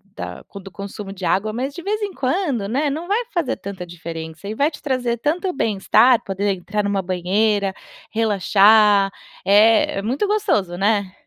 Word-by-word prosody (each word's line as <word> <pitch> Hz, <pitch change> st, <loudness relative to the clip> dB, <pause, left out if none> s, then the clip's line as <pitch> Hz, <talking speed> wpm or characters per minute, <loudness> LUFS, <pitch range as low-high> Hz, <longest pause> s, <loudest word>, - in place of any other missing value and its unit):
da -, -, -7 dB
co 200 Hz, -, -10 dB
do 195 Hz, 0 st, -11 dB
consumo 200 Hz, 0 st, -8 dB
de 190 Hz, -2 st, -6 dB
água, 205 Hz, +5 st, +1 dB
mas 260 Hz, +5 st, -3 dB
de 345 Hz, -, -7 dB
vez 425 Hz, +3 st, -2 dB
em 405 Hz, -2 st, -3 dB
quando, 270 Hz, -, -1 dB
né, 280 Hz, +7 st, 0 dB
não 315 Hz, +5 st, -4 dB
vai 435 Hz, +5 st, 0 dB
fazer 345 Hz, -7 st, -1 dB
tanta 190 Hz, -2 st, -7 dB
diferença 165 Hz, 0 st, -8 dB
e 215 Hz, -, -4 dB
vai 285 Hz, +6 st, +1 dB
te 295 Hz, -, -12 dB
trazer 250 Hz, -4 st, -1 dB
tanto 330 Hz, -, -1 dB
bem-estar 225 Hz, -, +3 dB
poder 200 Hz, +1 st, -1 dB
entrar 200 Hz, +3 st, -3 dB
numa 200 Hz, -1 st, 0 dB
banheira, 195 Hz, +3 st, 0 dB, 0.4 s
relaxar, 210 Hz, -1 st, +4 dB, 0.3 s
é 215 Hz, +2 st, +4 dB
é -, -, -3 dB
muito 255 Hz, -, -1 dB
gostoso, 385 Hz, -, 0 dB
né? 200 Hz, -1 st, +1 dB
210 Hz, 175 wpm, -20 LUFS, 195-270 Hz, 0.4 s, relaxar